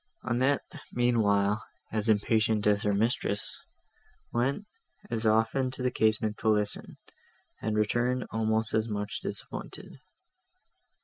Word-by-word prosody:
Annette, 130 +4 +1 0.3
meanwhile, 110 -4 +2 0.3
as 110 0 0
impatient 110 0 +2
as 105 -1 +3
her 105 - +1
mistress, 100 -2 0 0.7
went 135 +11 0 0.5
as 115 -1 0
often 115 +4 +2
to 130 0 -5
the 125 - +2
casement 110 -1 +1
to 110 - +1
listen, 105 -1 0 0.6
and 110 0 -1
returned 120 +4 +1
almost 110 0 +1
as 110 +1 +1
much 105 -1 -3
disappointed. - - -5
110 Hz, 115 wpm, -29 LUFS, 105-120 Hz, 0.7 s, as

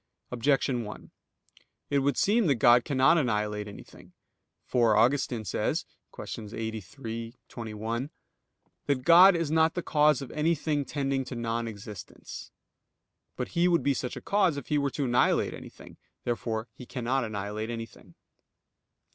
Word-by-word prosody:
Objection 125 0 +1
1: 105 0 -9 0.8
It 140 - +3
would 140 -1 0
seem 210 0 +3
that 140 - +3
God 120 +1 +5
cannot 140 +4 +4
annihilate 105 -5 -1
anything. 100 - -13 0.5
For 115 -4 +3
Augustine 120 -1 +2
says - - -1 0.3
(QQ. 110 0 -7
83, 115 +1 -5
qu. - - -38
21) 115 +3 -4 0.8
that 140 -3 0
"God 175 +4 +8
is 165 -3 -1
not 160 0 +3
the 175 - -2
cause 150 -2 +3
of 135 - -9
anything 150 -2 0
tending 135 -2 -1
to 125 - -7
non 115 0 -2
existence." 105 -2 -9 0.9
But - - -4
He 170 +1 +2
would 170 -2 +2
be 140 - +2
such 125 -1 -4
a - - -7
cause 190 -7 +2
if 140 - -7
He 150 - +2
were 140 0 0
to 140 +1 -2
annihilate 120 -1 +2
anything. - - -12 0.3
Therefore 115 -1 -2
He 125 - -12
cannot 130 +1 -1
annihilate 105 0 -4
anything. 115 -1 -8
125 Hz, 145 wpm, -28 LUFS, 115-145 Hz, 0.9 s, God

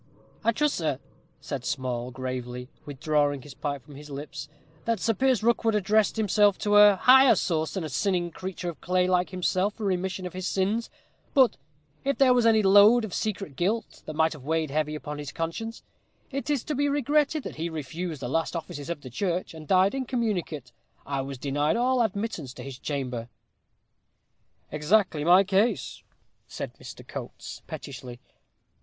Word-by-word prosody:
"I 230 - +4
trust, 300 +5 +1
sir," 155 -5 -1 0.4
said - - -5
Small, 125 -2 -2
gravely 125 -1 -5 0.2
withdrawing 145 -1 0
his 145 - -11
pipe 140 -2 -4
from 145 - -14
his 150 +1 -11
lips, 145 +1 -7 0.4
"that 230 -2 0
Sir 225 +4 +1
Piers 255 +1 +2
Rookwood 230 -1 +2
addressed 210 +1 +2
himself 205 -2 +3
to 205 0 +2
a 205 -1 +8
higher 260 +6 +7
source 160 -1 -1
than 190 - -2
a 155 - -4
sinning 175 +4 0
creature 185 +1 -6
of 170 - -9
clay 180 0 +2
like 180 0 +2
himself 185 +2 0
for 220 - -7
remission 190 0 -1
of 180 - -6
his 185 0 -4
sins; 205 +5 0 0.5
but, 260 - +5 0.5
if 275 0 0
there 265 -2 +6
was 245 -2 +3
any 220 -1 +5
load 205 +4 +7
of 200 - -8
secret 195 -9 -3
guilt 205 - -2
that 155 - -5
might 160 +1 +2
have 150 -4 -12
weighed 160 0 -1
heavy 155 +1 0
upon 150 -1 -6
his 145 -3 -6
conscience, 165 - -4 0.5
it 275 0 -4
is 285 -5 +1
to 305 - -3
be 285 +1 +1
regretted 290 +1 +1
that - - -7
he 165 +2 -2
refused 160 0 -5
the - - -2
last 165 +6 -1
offices 155 -2 -6
of 170 -4 -4
the 130 - -9
church, 180 - -2
and 155 -2 -10
died 190 +1 +4
incommunicate. 215 - -2 0.3
I 140 -1 -2
was 135 0 -6
denied 145 - 0
all 250 +1 +2
admittance 200 - -2
to - - -8
his 135 -2 -8
chamber." 125 -5 -4 1.4
"Exactly 155 0 +2
my 180 +4 +7
case," 200 +4 0 0.5
said - - -6
Mr. - - -11
Coates, - - -8
pettishly. 125 -3 -8
180 Hz, 175 wpm, -27 LUFS, 145-220 Hz, 1.4 s, a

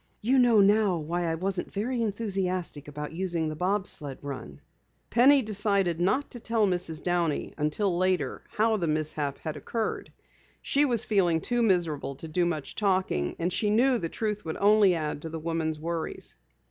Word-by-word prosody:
"You 260 +4 +3
know 235 -4 +5
now 200 -2 +3
why 170 +3 -2
I 165 -1 0
wasn't 185 +2 -3
very 235 +4 -2
enthusiastic 190 -8 -2
about 150 +1 -6
using 170 -2 -1
the 155 - -4
bob 190 +4 0
sled 145 -8 +1
run." 130 - -7 0.5
Penny 265 +3 +5
decided 200 -5 +1
not 260 +11 +1
to 245 - -7
tell 225 -1 +1
Mrs. 175 -4 -1
Downey 175 -4 -1
until 165 +5 0
later 185 +1 0
how 220 +1 +1
the 170 -4 -1
mishap 150 -2 -1
had 155 -2 -5
occurred. 220 - -4 0.5
She 285 +1 +2
was 235 -5 +3
feeling 180 -6 +2
too 240 +8 -1
miserable 170 -10 0
to 160 - -8
do 175 +2 0
much 155 -5 -4
talking, 185 - 0
and 175 +2 -1
she 210 - 0
knew 245 +4 +3
the 165 - -3
truth 210 +1 -3
would 160 - -4
only 205 -2 +5
add 150 -2 -3
to 160 - -6
the 160 - -5
woman's 160 -1 -2
worries. 165 0 -5
180 Hz, 175 wpm, -27 LUFS, 160-210 Hz, 0.5 s, know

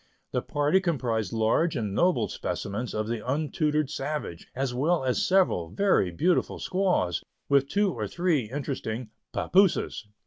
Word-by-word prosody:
The - - 0
party 145 +5 +2
comprised 120 - -1
large 115 +9 +2
and 105 -6 -2
noble 125 - +2
specimens 110 +5 -4
of 110 0 -1
the 115 -2 -3
untutored 150 +1 0
savage, 145 - -4
as 130 -1 -1
well 155 +5 +1
as 130 -1 +1
several 180 - +2
very 190 - +2
beautiful 165 - +1
squaws, 180 - 0 0.3
with 140 -1 +4
two 200 -2 +2
or - - -3
three 165 -11 0
interesting 130 -4 -4 0.2
"papooses." 185 - +2
140 Hz, 140 wpm, -27 LUFS, 110-170 Hz, 0.3 s, with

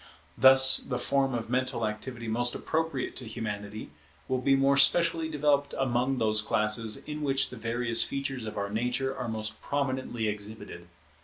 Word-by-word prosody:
Thus 130 0 +7
the 125 - -4
form 135 -1 0
of 115 -2 -4
mental 125 -1 -1
activity 115 +2 -5
most 120 +2 0
appropriate 160 -4 -2
to 125 - -6
Humanity 105 -4 -6 0.4
will 130 -1 0
be 135 +1 +3
more 135 +1 +3
specially 165 +3 +4
developed 145 -2 +1
among 130 0 0
those 110 -2 +1
classes 105 +1 +1
in 150 0 -6
which 135 -2 +2
the - - -7
various 115 0 +1
features 135 -3 -4
of 105 - -7
our 100 0 -3
nature 125 +4 -1
are 125 -3 -5
most 110 -1 -5
prominently 130 -5 -2
exhibited. 105 -4 -7
125 Hz, 160 wpm, -28 LUFS, 110-135 Hz, 0.4 s, Thus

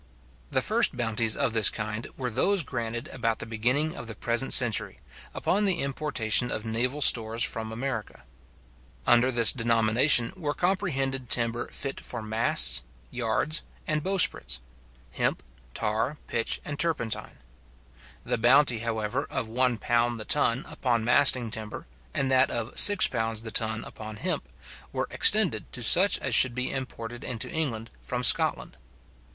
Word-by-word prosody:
The - - 0
first - - +1
bounties 115 -2 0
of 135 -5 -1
this 110 -3 +5
kind 110 +1 -6
were 125 -3 -4
those 195 - +1
granted 115 -2 -5
about 115 -3 -2
the - - -5
beginning 125 +8 -1
of 120 - -9
the 115 - -8
present 120 +5 -1
century, 120 -4 +4 0.3
upon 205 +2 0
the 185 -6 +3
importation 130 -4 0
of 110 - -5
naval 125 +6 -2
stores 115 -2 +4
from 110 -2 -3
America. 115 - -6 0.8
Under 120 +2 +4
this 115 -4 +5
denomination 115 +2 +2
were 150 -5 -4
comprehended 135 - -2
timber 115 0 +1
fit 135 -1 -5
for 120 -3 -6
masts, 110 - +3 0.3
yards, 125 +6 -1 0.2
and 155 0 -2
bowsprits; 180 - +1 0.5
hemp, 65 - -2 0.3
tar, 110 +7 -2
pitch, 115 - -2
and 145 -1 -6
turpentine. 160 -10 -2 0.9
The - - -2
bounty, 125 0 +3
however, 115 +3 -3
of 115 - -4
£1 120 -1 0
the 110 - -8
ton 115 +4 0
upon 120 -3 -2
masting 120 0 +3
timber, 110 -1 -6 0.3
and 135 -1 -2
that 130 0 +3
of 115 +1 -4
£6 115 - +4
the 110 - -7
ton 110 0 0
upon 110 0 -9
hemp, 105 - -3 0.4
were - - -3
extended - - +2
to - - -6
such - - +5
as - - -4
should 125 -2 +5
be 125 0 -1
imported 120 -3 -7
into 120 +5 -5
England 130 -9 -4
from 125 0 -5
Scotland. - - +2
120 Hz, 145 wpm, -26 LUFS, 110-135 Hz, 0.9 s, this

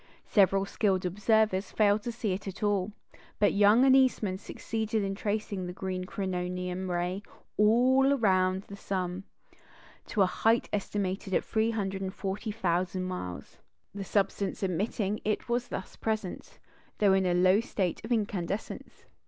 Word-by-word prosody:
Several 195 -1 +3
skilled 195 -2 0
observers 210 +1 +2
failed 210 0 +3
to 240 - -4
see 225 -4 -2
it 195 +2 -5
at 195 +3 -6
all; 205 -1 +1 0.5
but 205 - +3
Young 210 +5 +5
and 265 -1 +6
Eastman 220 -8 +2
succeeded 220 +1 -3
in 195 0 -1
tracing 205 -2 -3
the 180 - -5
green 185 -1 -4
"coronium" 180 -1 -3
ray 180 +2 -1 0.3
all 260 +6 +4
round 185 -4 +2
the 200 - -10
sun, 185 -1 -3 0.8
to 205 - +2
a - - +5
height 225 +5 +2
estimated 195 -2 -2
at - - +1
340,000 195 -3 -1
miles. 90 - -6 0.3
The 200 0 -5
substance 200 0 -1
emitting 195 +3 -1
it 215 0 -1
was 240 0 -1
thus 190 - -6
present, 215 -4 -4 0.4
though 200 -2 +4
in 190 -1 +2
a 175 - +2
low 185 +3 +5
state 190 -6 -2
of 220 - -7
incandescence. 205 -3 -3
195 Hz, 140 wpm, -29 LUFS, 185-215 Hz, 0.8 s, and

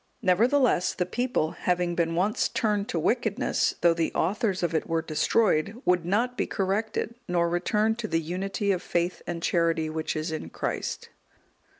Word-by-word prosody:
Nevertheless, 230 +2 +3
the 180 - 0
people, 230 -5 -1
having 180 -1 0
been 165 -1 0
once 195 +5 +1
turned 215 -5 0
to - - -1
wickedness, 230 - +1
though 170 -1 +5
the 165 -1 -1
authors 195 +1 0
of 170 -1 0
it 160 - 0
were 165 -1 0
destroyed, 190 +5 +1
would 180 -2 +2
not 235 +6 +1
be - - -1
corrected, 210 +4 -1
nor 175 -2 +2
return 210 +6 +1
to 235 -2 -3
the 165 -4 +1
unity 195 +5 -2
of 180 -2 0
faith 175 0 -1
and 170 -1 -4
charity 165 -2 +1
which 160 0 -3
is 155 +1 -2
in 155 - -5
Christ. - - -4
180 Hz, 170 wpm, -27 LUFS, 165-215 Hz, -, though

